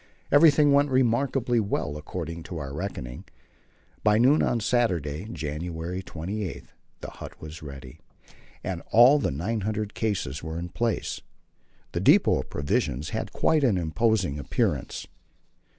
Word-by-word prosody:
Everything 145 0 +6
went 140 +1 +4
remarkably 125 -1 +2
well 100 -8 -2
according 85 +2 -6
to 85 +1 -7
our 70 -3 -5
reckoning. 70 -7 -5 0.8
By 105 0 +4
noon 130 +7 +5
on 120 - +1
Saturday, 90 - 0
January 80 +3 -4
28, 95 +2 -5 0.4
the - - -7
hut - - -10
was 80 +1 -9
ready, 70 -4 -10 0.6
and 90 -3 -3
all 125 +6 +7
the 115 - 0
900 105 +7 -2
cases 90 - -2
were 80 0 -5
in 85 +1 -4
place. 115 +4 -2 0.7
The - - -2
depot - - +5
of - - -6
provisions 70 0 -1
had - - -4
quite 155 -2 +2
an 115 -8 +3
imposing 90 -2 +1
appearance. 65 - -1
95 Hz, 135 wpm, -26 LUFS, 80-115 Hz, 0.8 s, all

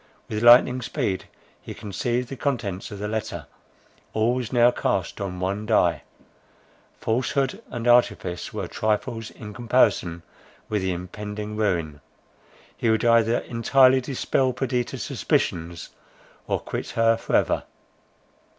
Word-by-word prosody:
With 105 0 -3
lightning 125 +2 +7
speed 95 -4 -2 0.4
he - - -8
conceived 120 +5 -2
the 135 - -5
contents 115 -9 -3
of 100 - -7
the 105 +1 -4
letter; 110 0 -4 0.7
all 110 +2 +2
was 125 -3 -3
now 120 -1 +5
cast 100 -5 -2
on 90 -2 -4
one 100 +3 -2
die; 90 -7 +3 1.0
falsehood 130 +3 0
and 120 0 -4
artifice 120 -7 +2
were - - -4
trifles 110 +1 -2
in 105 -1 -10
comparison 105 -7 +1 0.4
with 105 -2 -1
the 95 0 0
impending 105 +4 -6
ruin. 85 -9 -1 0.7
He 115 - 0
would 110 +1 +2
either 115 0 +4
entirely 130 +2 +4
dispel 130 0 0
Perdita's 125 -1 -2
suspicions, 85 0 -1 0.6
or - - 0
quit - - -5
her 115 0 +4
for 115 - -2
ever. - - +2
110 Hz, 130 wpm, -24 LUFS, 100-120 Hz, 1.0 s, lightning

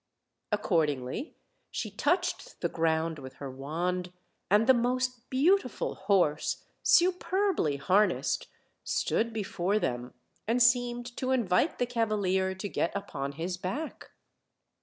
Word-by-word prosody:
Accordingly, 150 - 0 0.3
she 215 - -4
touched 355 - -1
the - - +1
ground 160 -1 0
with 130 -1 -9
her 140 -2 -7
wand, 175 +7 -3 0.4
and 210 +3 +5
the 260 - +7
most 250 0 -1
beautiful 280 - +2
horse, 190 -7 +1 0.2
superbly 365 - +3
harnessed, 190 +10 +2 0.4
stood 230 +1 0
before 200 -2 -1
them, 125 -9 -2 0.3
and 235 +3 +2
seemed 240 0 +2
to 255 - -2
invite 245 - +2
the 245 - +1
cavalier 205 -6 0
to 190 +2 -4
get 170 - -1
upon 140 -9 -4
his 175 +5 -3
back. 255 - -5
205 Hz, 115 wpm, -29 LUFS, 165-250 Hz, 0.4 s, the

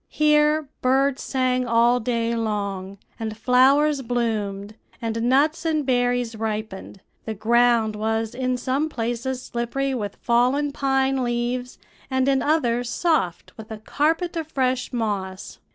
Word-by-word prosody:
Here 300 0 +3
birds 270 +1 +2
sang 255 -1 0
all 235 +1 +3
day 235 0 -1
long, 200 -3 -3 0.2
and 220 -1 -4
flowers 270 +5 +4
bloomed, 215 -4 -2 0.3
and 230 -1 -3
nuts 275 +6 +2
and 310 -3 0
berries 245 -2 0
ripened; 215 -3 -5 0.2
the 220 - -4
ground 230 0 +3
was 220 +1 -1
in 255 0 -1
some 265 +5 -1
places 245 +1 -3
slippery 265 +3 -2
with 210 -5 -4
fallen 255 +5 +1
pine 270 -1 +1
leaves, 245 +1 -2 0.3
and 260 0 +1
in 270 -1 +3
others 245 -6 +1
soft 240 - -1
with 220 -1 -10
a 220 - -6
carpet 320 - -1
of 325 -2 -3
fresh 255 -3 -1
moss. 205 -6 -4
245 Hz, 135 wpm, -23 LUFS, 225-270 Hz, 0.3 s, flowers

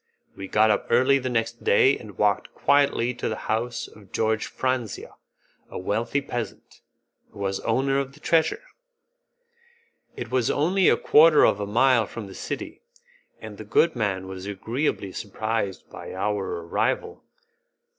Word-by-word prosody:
We 95 - -7
got 110 +2 +4
up 105 - -1
early 130 +4 +4
the 130 -1 -3
next 115 -1 -2
day 130 +7 +4
and 105 -5 -11
walked 105 -1 0
quietly 140 -4 +2
to - - -3
the 110 - -2
house 115 +2 -2
of 100 -3 -17
George 110 -1 0
Franzia, 130 -5 -3 0.6
a - - -7
wealthy 115 +8 -1
peasant, 120 -4 -7 0.5
who - - -18
was 95 -1 -2
owner 135 +1 +1
of 135 0 -4
the 150 - -17
treasure. 165 - +1 1.5
It 120 -1 -7
was 125 -3 +1
only 180 +6 +3
a - - +4
quarter 155 0 +6
of 100 - +2
a 100 - -3
mile 120 +1 +3
from 115 -3 -7
the 95 - -10
city, - - -6 0.6
and 110 -2 -10
the - - -6
good 155 +10 +2
man 95 -5 -2
was 95 0 -7
agreeably 100 +1 -2
surprised 110 -1 -3
by - - -9
our 100 -3 -2
arrival. 445 - -1
115 Hz, 155 wpm, -25 LUFS, 100-130 Hz, 1.5 s, quarter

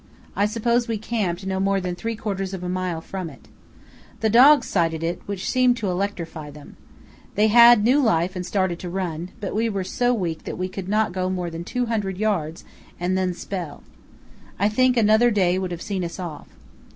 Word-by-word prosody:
I 205 - +2
suppose 235 +2 0
we 225 -1 -1
camped 200 -5 -2
no 190 0 -2
more 195 0 +1
than 180 -1 -3
three 225 +5 -4
quarters 195 -3 -3
of 180 - -8
a - - -3
mile 180 -2 -2
from 185 -1 -6
it. 135 - -16 0.7
The 220 -1 +2
dogs 275 +6 +7
sighted 165 -3 0
it, 170 +1 -2
which 200 -2 -4
seemed 255 -1 +3
to 205 -5 -2
electrify 170 -5 -4
them. 145 0 -13 0.6
They 215 +2 +3
had 235 -1 +8
new 255 +6 +4
life 185 -6 +1
and 180 - -3
started 185 -2 -1
to 180 - -6
run, 175 -2 -3
but 200 -4 -4
we 225 +2 +1
were 200 -3 -2
so 245 +6 0
weak 175 -9 -2
that - - -5
we 185 +1 -2
could 190 0 -7
not 215 0 +1
go 185 0 -1
more 180 -2 -3
than 165 +1 -6
200 220 -4 -2
yds. 180 -7 -1 0.4
and 180 +2 0
then 185 -1 0
spell. 175 -4 -6 0.7
I 200 +2 +2
think 255 +3 +2
another 220 +2 +5
day 185 -4 +2
would 185 -1 -3
have 175 -1 -6
seen 195 -4 -3
us 170 - -5
off. 170 -5 -7
190 Hz, 200 wpm, -23 LUFS, 175-220 Hz, 0.7 s, had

